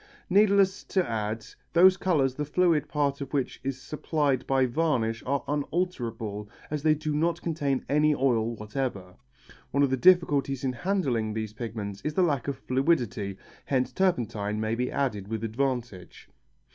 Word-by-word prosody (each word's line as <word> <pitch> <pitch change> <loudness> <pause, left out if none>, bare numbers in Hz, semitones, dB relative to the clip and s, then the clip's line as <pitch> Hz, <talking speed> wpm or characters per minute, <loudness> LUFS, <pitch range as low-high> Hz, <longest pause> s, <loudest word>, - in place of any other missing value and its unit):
Needless 200 -1 +4
to 185 -2 0
add, 110 -1 -3 0.3
those 185 +2 +7
colours 150 -9 +1
the 150 - -3
fluid 160 0 +2
part 140 -1 0
of 140 - -5
which 135 -3 -2
is 135 -1 -3
supplied 145 -1 -1
by 135 -1 +3
varnish 120 -5 0
are 140 +1 0
unalterable 120 - -2 0.2
as 150 -1 -2
they 155 0 +4
do 155 0 -3
not 165 +3 +1
contain 145 -5 -1
any 150 +1 +3
oil 120 -4 +1
whatever. 105 -4 -4 0.6
One 140 - +2
of 140 - +2
the 130 - +2
difficulties 140 -4 +3
in 130 -1 0
handling 125 - -1
these 110 -1 -3
pigments 105 -3 -5
is 150 0 -3
the 185 - +4
lack 145 -8 0
of 140 -2 -2
fluidity, 125 - 0 0.3
hence 130 -2 0
turpentine 110 - 0
may 110 0 -1
be 125 +2 -1
added 105 -9 -1
with 110 0 -4
advantage. 115 -5 -3
135 Hz, 160 wpm, -27 LUFS, 115-155 Hz, 0.6 s, those